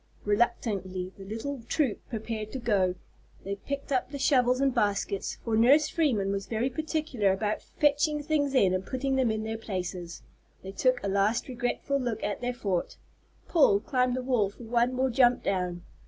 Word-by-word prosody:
Reluctantly 195 Hz, -4 st, 0 dB
the 195 Hz, -, -11 dB
little 225 Hz, +7 st, -5 dB
troop 280 Hz, -9 st, 0 dB
prepared 220 Hz, -2 st, -4 dB
to -, -, -4 dB
go. 200 Hz, -7 st, +1 dB, 0.5 s
They 200 Hz, +1 st, -4 dB
picked 280 Hz, +6 st, -5 dB
up 255 Hz, -2 st, +1 dB
the 280 Hz, -, -6 dB
shovels 255 Hz, -2 st, +3 dB
and 275 Hz, -1 st, +2 dB
baskets, 200 Hz, -4 st, -1 dB
for 225 Hz, -2 st, 0 dB
Nurse 270 Hz, +7 st, +5 dB
Freeman 235 Hz, -, +1 dB
was 195 Hz, 0 st, -3 dB
very 235 Hz, +4 st, -1 dB
particular 305 Hz, -, 0 dB
about 210 Hz, +2 st, -1 dB
fetching 295 Hz, 0 st, +1 dB
things 285 Hz, -2 st, 0 dB
in 190 Hz, -7 st, +4 dB
and 185 Hz, 0 st, -1 dB
putting 265 Hz, +5 st, -2 dB
them 260 Hz, -3 st, +2 dB
in 220 Hz, 0 st, -1 dB
their 220 Hz, 0 st, -4 dB
places. 180 Hz, -4 st, -5 dB, 0.4 s
They 190 Hz, -, -6 dB
took 255 Hz, +5 st, +1 dB
a -, -, -1 dB
last 200 Hz, +3 st, +1 dB
regretful 255 Hz, +2 st, -1 dB
look 240 Hz, -4 st, -3 dB
at 205 Hz, +1 st, -2 dB
their 245 Hz, 0 st, -1 dB
fort. 195 Hz, -7 st, -2 dB, 0.5 s
Paul 280 Hz, -, +4 dB
climbed 250 Hz, +2 st, 0 dB
the 255 Hz, -, -3 dB
wall 245 Hz, -6 st, +2 dB
for 205 Hz, -, -13 dB
one 235 Hz, +2 st, +1 dB
more 260 Hz, 0 st, 0 dB
jump 245 Hz, 0 st, +4 dB
down. 180 Hz, -2 st, -1 dB
235 Hz, 180 wpm, -28 LUFS, 200-265 Hz, 0.5 s, Nurse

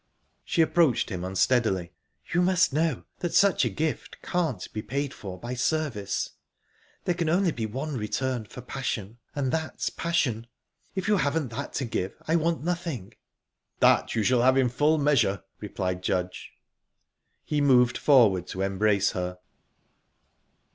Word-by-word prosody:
She 165 Hz, -, +2 dB
approached 160 Hz, -8 st, +2 dB
him 90 Hz, -2 st, -4 dB
unsteadily. 95 Hz, -2 st, +1 dB, 0.4 s
"You 175 Hz, -, +3 dB
must 180 Hz, -4 st, +3 dB
know 155 Hz, -3 st, 0 dB, 0.2 s
that 175 Hz, -, -2 dB
such 200 Hz, -6 st, +5 dB
a -, -, +1 dB
gift 150 Hz, +9 st, -3 dB
can't 160 Hz, -, -1 dB
be 110 Hz, -, -3 dB
paid 140 Hz, +4 st, -3 dB
for 95 Hz, -3 st, -8 dB
by 120 Hz, +1 st, -5 dB
service. 125 Hz, -6 st, -1 dB, 0.7 s
There 180 Hz, -, +1 dB
can 170 Hz, -2 st, -1 dB
only 180 Hz, +1 st, +3 dB
be 115 Hz, -6 st, -3 dB
one 135 Hz, +7 st, -4 dB
return 120 Hz, +1 st, -2 dB
for 125 Hz, -, -10 dB
passion, 120 Hz, -4 st, -4 dB, 0.2 s
and 135 Hz, -3 st, 0 dB
that's 160 Hz, -1 st, -2 dB
passion. 130 Hz, -9 st, -1 dB, 0.5 s
If 190 Hz, 0 st, -2 dB
you 210 Hz, -1 st, +4 dB
haven't 145 Hz, -3 st, 0 dB
that 110 Hz, -, -6 dB
to 135 Hz, -, -1 dB
give, 95 Hz, -4 st, -3 dB
I 160 Hz, -, +2 dB
want 165 Hz, -1 st, +1 dB
nothing." 165 Hz, -, -3 dB, 0.7 s
"That -, -, +4 dB
you 110 Hz, -, +1 dB
shall 125 Hz, +2 st, +3 dB
have 130 Hz, +2 st, +4 dB
in 130 Hz, -2 st, +3 dB
full 150 Hz, +6 st, +2 dB
measure," 130 Hz, -10 st, +2 dB, 0.2 s
replied 90 Hz, -3 st, -3 dB
Judge. 90 Hz, 0 st, -2 dB, 0.9 s
He 150 Hz, -1 st, -1 dB
moved 125 Hz, -3 st, +5 dB
forward 110 Hz, -, +4 dB
to 95 Hz, -, -3 dB
embrace 100 Hz, +1 st, +2 dB
her. 90 Hz, 0 st, -4 dB
130 Hz, 150 wpm, -27 LUFS, 105-155 Hz, 0.9 s, such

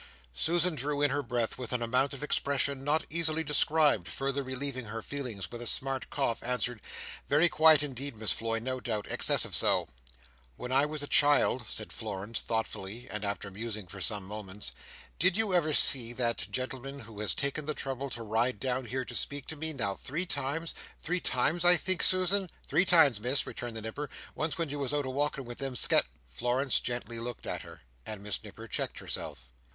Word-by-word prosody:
Susan 170 Hz, -, +2 dB
drew 145 Hz, 0 st, -2 dB
in 145 Hz, -, +3 dB
her 145 Hz, +1 st, 0 dB
breath 120 Hz, -3 st, -2 dB
with 125 Hz, -, -5 dB
an 125 Hz, -1 st, -1 dB
amount 130 Hz, +4 st, +1 dB
of 140 Hz, +1 st, -6 dB
expression 140 Hz, -2 st, +1 dB
not 150 Hz, +3 st, +1 dB
easily 160 Hz, -1 st, +2 dB
described, 150 Hz, -, +3 dB
further 135 Hz, +1 st, -2 dB
relieving 130 Hz, -1 st, -4 dB
her 110 Hz, +1 st, -6 dB
feelings 125 Hz, -9 st, -5 dB
with 120 Hz, -, -7 dB
a 120 Hz, -, -4 dB
smart 135 Hz, +1 st, 0 dB
cough, 135 Hz, -5 st, -1 dB
answered, 125 Hz, -2 st, -1 dB, 0.5 s
"Very 150 Hz, +5 st, +5 dB
quiet 155 Hz, -2 st, +6 dB
indeed, 135 Hz, -2 st, -5 dB
Miss 110 Hz, -1 st, +2 dB
Floy, 115 Hz, 0 st, -1 dB
no 130 Hz, +3 st, -3 dB
doubt. 110 Hz, -4 st, -3 dB
Excessive -, -, +1 dB
so." -, -, +3 dB, 0.7 s
"When 125 Hz, -, -6 dB
I 135 Hz, +3 st, +3 dB
was 150 Hz, -1 st, -3 dB
a -, -, -4 dB
child," 145 Hz, -4 st, +4 dB
said 110 Hz, -, -4 dB
Florence, 105 Hz, 0 st, -4 dB
thoughtfully, 110 Hz, +1 st, -4 dB
and 105 Hz, 0 st, -4 dB
after 100 Hz, 0 st, -4 dB
musing 105 Hz, 0 st, -5 dB
for 95 Hz, +2 st, -10 dB
some 105 Hz, +1 st, +1 dB
moments, 105 Hz, 0 st, -6 dB, 0.5 s
"did 185 Hz, +2 st, +5 dB
you 220 Hz, -4 st, +3 dB
ever 165 Hz, -3 st, +3 dB
see 120 Hz, -5 st, +7 dB
that 120 Hz, -1 st, -1 dB
gentleman 130 Hz, +2 st, -4 dB
who 110 Hz, -2 st, -11 dB
has 105 Hz, -, +1 dB
taken 140 Hz, +2 st, -1 dB
the 155 Hz, -, -1 dB
trouble 135 Hz, 0 st, -4 dB
to 120 Hz, -2 st, -4 dB
ride 115 Hz, +1 st, 0 dB
down 130 Hz, +2 st, -2 dB
here 130 Hz, +2 st, -3 dB
to -, -, -8 dB
speak 145 Hz, -1 st, -2 dB
to 160 Hz, -, -3 dB
me, 160 Hz, +1 st, 0 dB
now 110 Hz, -9 st, -1 dB
three 150 Hz, -, -4 dB
times—three 160 Hz, +4 st, -3 dB
times, 155 Hz, +5 st, +1 dB
I 175 Hz, 0 st, +7 dB
think, 185 Hz, +1 st, 0 dB
Susan?" 185 Hz, +1 st, +4 dB, 0.2 s
"Three 180 Hz, -, +3 dB
times, 155 Hz, -, +6 dB
Miss," 125 Hz, +5 st, +1 dB
returned 120 Hz, -2 st, -6 dB
the 110 Hz, -, -5 dB
Nipper. 140 Hz, +7 st, -5 dB, 0.2 s
"Once 155 Hz, 0 st, -2 dB
when 165 Hz, -3 st, -1 dB
you 145 Hz, -, -4 dB
was 140 Hz, +1 st, -1 dB
out 145 Hz, -1 st, 0 dB
a 130 Hz, -, -3 dB
walking 140 Hz, 0 st, -1 dB
with 120 Hz, 0 st, -8 dB
them 135 Hz, -2 st, -3 dB
Sket—" -, -, +5 dB, 0.2 s
Florence 125 Hz, -, +1 dB
gently 120 Hz, -1 st, -4 dB
looked 120 Hz, 0 st, -6 dB
at -, -, -3 dB
her, -, -, -13 dB, 0.2 s
and 105 Hz, -2 st, -7 dB
Miss 105 Hz, -1 st, -1 dB
Nipper -, -, -10 dB
checked -, -, -3 dB
herself. -, -, -4 dB
130 Hz, 195 wpm, -30 LUFS, 115-145 Hz, 0.7 s, see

